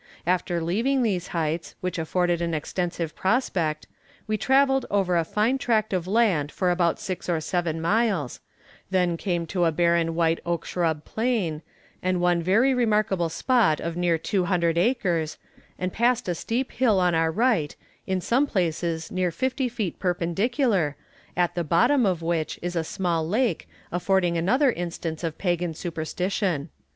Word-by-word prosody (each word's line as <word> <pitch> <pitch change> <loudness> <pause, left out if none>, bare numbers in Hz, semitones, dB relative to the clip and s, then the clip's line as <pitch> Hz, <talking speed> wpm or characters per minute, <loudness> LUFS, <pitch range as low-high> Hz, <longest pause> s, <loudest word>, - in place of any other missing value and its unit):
After 175 0 0
leaving 240 +10 +1
these 185 -6 -1
heights, 165 0 -2
which 180 -1 -3
afforded 175 +1 0
an 170 -1 -1
extensive 170 +1 -3
prospect, 185 -8 0 0.4
we 215 - -1
travelled 270 +4 +3
over 195 -3 +1
a 170 - +3
fine 220 +10 0
tract 220 -4 +1
of 180 -1 -1
land 190 -9 +2
for 180 -2 0
about 175 -1 +1
six 185 -1 -5
or 170 -2 +1
seven 165 0 -1
miles; 190 - 0 0.5
then 180 -2 +1
came 175 -1 -2
to 175 +1 0
a 165 - +3
barren 170 0 +2
white 165 -1 +2
oak 170 -1 -2
shrub 160 -4 -1
plain, 220 -10 -1 0.4
and 185 0 0
one 175 -1 +2
very 220 +10 +3
remarkable 210 -7 +1
spot 205 - +2
of 170 0 -4
near 175 -1 +1
two 180 +3 -1
hundred 170 -3 +1
acres, 175 -6 0 0.4
and 185 0 -3
passed 240 0 +1
a 175 - +1
steep 235 +9 -2
hill 225 -7 +2
on 180 -1 +2
our 160 0 +2
right, 215 - +1 0.3
in 190 -1 0
some 255 +10 +2
places 170 - -1
near 185 -1 0
fifty 260 - -1
feet 220 -8 -4
perpendicular, 185 - 0 0.4
at 175 -1 +2
the 175 - -1
bottom 235 - +3
of 175 -3 -1
which 165 -2 -1
is 175 0 -3
a 165 - +1
small 170 -2 -1
lake, 215 -1 0 0.2
affording 180 0 +1
another 250 - +3
instance 170 -3 -5
of 165 -2 -3
pagan 175 -3 -1
superstition. 170 0 -2
180 Hz, 160 wpm, -25 LUFS, 165-215 Hz, 0.5 s, travelled